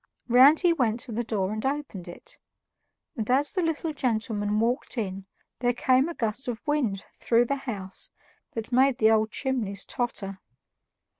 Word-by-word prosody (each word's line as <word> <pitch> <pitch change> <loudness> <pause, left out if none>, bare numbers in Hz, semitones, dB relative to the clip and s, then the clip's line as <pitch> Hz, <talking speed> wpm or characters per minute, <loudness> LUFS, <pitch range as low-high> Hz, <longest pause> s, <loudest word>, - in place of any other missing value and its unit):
Round 260 +6 +7
he 350 -2 +4
went 240 -7 0
to 260 - -7
the 230 +2 -1
door 205 -4 -1
and 215 0 -4
opened 270 -10 -3
it; 175 - -11 0.8
and 220 -4 -3
as 275 +3 +2
the 370 - 0
little 325 -1 -1
gentleman 220 -5 0
walked 240 +3 -1
in, 195 -3 -3 0.3
there 245 0 +2
came 260 +4 +3
a 340 - -6
gust 225 +3 -3
of 235 -2 -3
wind 255 -10 0
through 235 +1 +2
the 280 - 0
house 190 -4 -4 0.4
that 225 +1 -5
made 260 +1 +4
the 220 -3 +5
old 220 0 +3
chimneys 230 -7 -2
totter. 195 -6 -4
235 Hz, 165 wpm, -27 LUFS, 215-265 Hz, 0.8 s, Round